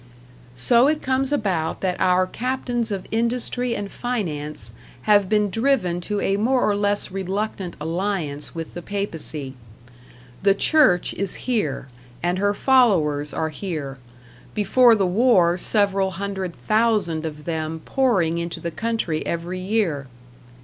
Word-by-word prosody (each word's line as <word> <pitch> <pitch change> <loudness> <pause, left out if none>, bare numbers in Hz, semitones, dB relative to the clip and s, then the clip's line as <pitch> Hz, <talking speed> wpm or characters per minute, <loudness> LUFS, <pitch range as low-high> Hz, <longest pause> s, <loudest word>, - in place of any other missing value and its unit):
So 235 - +4
it 305 +1 0
comes 260 +1 0
about 190 - -1
that 185 -2 0
our 185 0 +4
captains 245 +2 -2
of 195 -3 -4
industry 240 +1 0
and 200 -1 -5
finance 150 - -4 0.3
have 205 -3 +4
been 210 -2 +2
driven 225 -7 +1
to 205 +3 -2
a 195 0 +1
more 250 +5 +2
or 205 - +2
less 205 -1 0
reluctant 195 0 -3
alliance 165 -3 -2
with 165 -1 -6
the 175 - -6
Papacy. 160 -8 -4 0.9
The 195 0 +4
Church 255 - +3
is 195 -2 -3
here, 210 - -1 0.4
and 175 +1 0
her 205 +1 +1
followers 170 - +3
are 160 - -2
here, 150 -5 -5 0.6
before 230 +3 +5
the 200 -3 +1
war 180 -3 +4
several 195 0 +1
hundred 190 -1 -4
thousand 215 -8 +1
of 150 -2 -6
them 160 -1 -3
pouring 190 -12 +1
into 170 0 -4
the 170 - -4
country 225 -6 -2
every 170 +2 -3
year. 185 -8 -1
195 Hz, 135 wpm, -23 LUFS, 170-225 Hz, 0.9 s, before